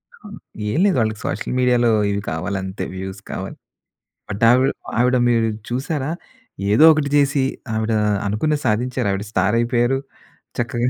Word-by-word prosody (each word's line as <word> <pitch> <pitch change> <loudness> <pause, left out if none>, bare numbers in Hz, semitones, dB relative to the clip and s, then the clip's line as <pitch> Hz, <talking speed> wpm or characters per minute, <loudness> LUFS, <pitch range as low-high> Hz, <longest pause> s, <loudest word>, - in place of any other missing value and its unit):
ఆ! 215 - -15 0.4
ఏం - - -1
లేదు. 200 - +3
వాళ్ళకి 110 -2 -1
సోషల్ - - -3
మీడియాలో 125 -1 +3 0.2
ఇవి 100 0 -2
కావాలి 80 +5 -3
అంతే 95 +1 -5
వ్యూస్ 95 +1 -7
కావాలి. - - -6 0.7
బట్ 105 +1 -5
ఆవిడ 130 +2 +4 0.3
ఆవిడ 125 +1 +3
మీరు 115 -1 +2 0.2
చూసారా? 135 +3 -2 0.6
ఏదో 110 +9 +5
ఒకటి 150 -2 -1
చేసి 140 -1 +3 0.3
ఆవిడ 110 +1 -1 0.3
అనుకున్నది 145 +9 0
సాధించారు. 120 +1 0
ఆవిడ 100 +1 -3
స్టార్ 95 +3 +1
అయిపోయారు. 120 +2 +1 0.6
చక్కగా. 120 0 0
120 Hz, 145 wpm, -20 LUFS, 105-130 Hz, 0.7 s, ఏదో